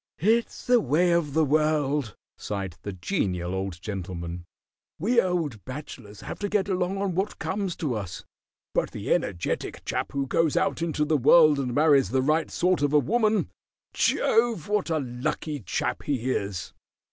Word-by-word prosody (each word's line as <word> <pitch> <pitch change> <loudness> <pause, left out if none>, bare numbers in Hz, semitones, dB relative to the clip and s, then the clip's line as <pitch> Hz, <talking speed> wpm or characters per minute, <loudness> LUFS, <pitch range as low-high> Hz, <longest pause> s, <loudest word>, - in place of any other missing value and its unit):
"It's 225 +6 +1
the 245 -1 +5
way 160 +6 +2
of 160 -4 +1
the 160 -1 +4
world," 150 -5 +1 0.2
sighed 95 -4 -4
the 100 - -5
Genial 90 - -2
Old 95 -2 -3
Gentleman. 85 -3 -5 0.5
"We 235 +8 +3
old 165 - -2
bachelors 130 -6 -9
have - - -7
to 205 - -2
get 200 -2 +1
along 185 0 -1
on 195 -2 -1
what 190 +4 -2
comes 190 -2 -2
to 145 -6 -2
us, 95 -5 -5 0.5
but - - +1
the - - -1
energetic 90 -3 -2
chap - - -2
who 140 -1 0
goes 160 +3 +1
out - - +1
into 155 -2 0
the 155 0 +2
world 150 +2 +6
and 125 -3 -2
marries 145 - +4
the 130 +3 +1
right 155 +3 +1
sort 180 -3 +1
of 145 0 +1
a - - +7
woman 215 - +1 0.4
Jove, 225 -7 +2
what 205 -3 0
a 160 - +1
lucky 140 +4 -3
chap 105 - -2
he 130 -3 -1
is!" 100 -6 -3
150 Hz, 170 wpm, -26 LUFS, 110-180 Hz, 0.5 s, a